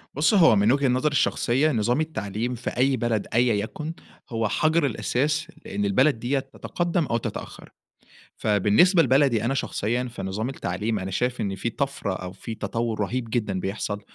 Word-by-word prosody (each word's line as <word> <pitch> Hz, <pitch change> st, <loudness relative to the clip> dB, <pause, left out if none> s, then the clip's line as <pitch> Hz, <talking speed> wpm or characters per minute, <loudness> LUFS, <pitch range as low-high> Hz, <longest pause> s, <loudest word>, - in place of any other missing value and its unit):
بُص، 155 Hz, +8 st, +3 dB
هو 165 Hz, -, +6 dB
من 105 Hz, +4 st, +4 dB
وجهة 140 Hz, 0 st, +2 dB
نظري 130 Hz, +4 st, +1 dB
الشخصية، 140 Hz, +1 st, +2 dB
نظام 120 Hz, +4 st, +1 dB
التعليم 120 Hz, -6 st, -3 dB
في 120 Hz, -, -4 dB
أي 130 Hz, +1 st, +1 dB
بلد 115 Hz, -2 st, -1 dB
أيًا 120 Hz, 0 st, +3 dB
يَكُن، 150 Hz, +10 st, -3 dB, 0.4 s
هو 115 Hz, -3 st, 0 dB
حَجر 155 Hz, +8 st, +2 dB
الأساس، 150 Hz, +4 st, 0 dB, 0.2 s
لإن 100 Hz, +1 st, -2 dB
البلد 130 Hz, +6 st, +3 dB
ديّة 130 Hz, +4 st, 0 dB
تتقدَّم 170 Hz, +5 st, -2 dB
أو 115 Hz, -3 st, 0 dB
تتأخّّر. -, -, -7 dB, 0.7 s
فبالنسبة 110 Hz, -, +4 dB
لبلدي 130 Hz, -4 st, +3 dB
أنا 135 Hz, -, +1 dB
شخصيًا 120 Hz, -2 st, -1 dB
في 120 Hz, -1 st, -7 dB
نظام 105 Hz, +6 st, -3 dB
التعليم، 105 Hz, -2 st, -2 dB
أنا 95 Hz, +1 st, -5 dB
شايف 125 Hz, +4 st, -1 dB
إن 100 Hz, -2 st, -2 dB
في 115 Hz, +5 st, -2 dB
طَفرة 135 Hz, -6 st, -2 dB
أو 90 Hz, -1 st, -6 dB
في 110 Hz, +4 st, -7 dB
تطوّر 115 Hz, -1 st, -3 dB
رهيب 115 Hz, +3 st, -2 dB
جدًا 105 Hz, -5 st, -1 dB
بيحصل. 100 Hz, +2 st, -3 dB
120 Hz, 170 wpm, -25 LUFS, 105-140 Hz, 0.7 s, هو